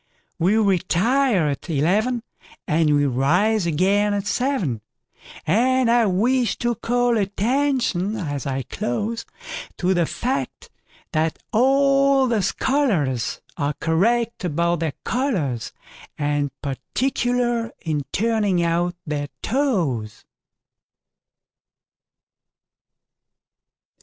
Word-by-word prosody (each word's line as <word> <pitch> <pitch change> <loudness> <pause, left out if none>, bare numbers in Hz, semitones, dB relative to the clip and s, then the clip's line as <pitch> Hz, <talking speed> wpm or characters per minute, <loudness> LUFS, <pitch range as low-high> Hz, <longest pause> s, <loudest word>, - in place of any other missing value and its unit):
We 190 +6 +3
retire 200 - +2
at 140 +5 -5
eleven, 205 - +1 0.4
And 155 -3 +3
we 145 0 +3
rise 170 - +2
again 200 +6 +2
at 200 0 -2
seven; 205 - -1 0.6
And 245 +7 +3
I 235 -2 +4
wish 235 +5 +1
to 240 0 0
call 240 +1 +1
attention, 220 -1 0
as 145 - -4
I 135 -1 -2
close, 210 - -3 0.5
To 180 +1 +1
the 175 -3 +1
fact 260 +3 -3 0.4
that 160 0 0 0.2
all 275 +2 +4
the 230 -3 +1
scholarsAre 150 - -1
correct 225 +8 +1
about 170 0 0
their 160 -3 -1
collars, 185 - -1 0.5
And 145 -1 0
particular 240 - -1
in 155 -3 -1
turning 210 -5 +1
out 170 +1 0
their 145 -2 -3 0.2
toes. 175 - -1
200 Hz, 90 wpm, -22 LUFS, 155-240 Hz, 0.6 s, I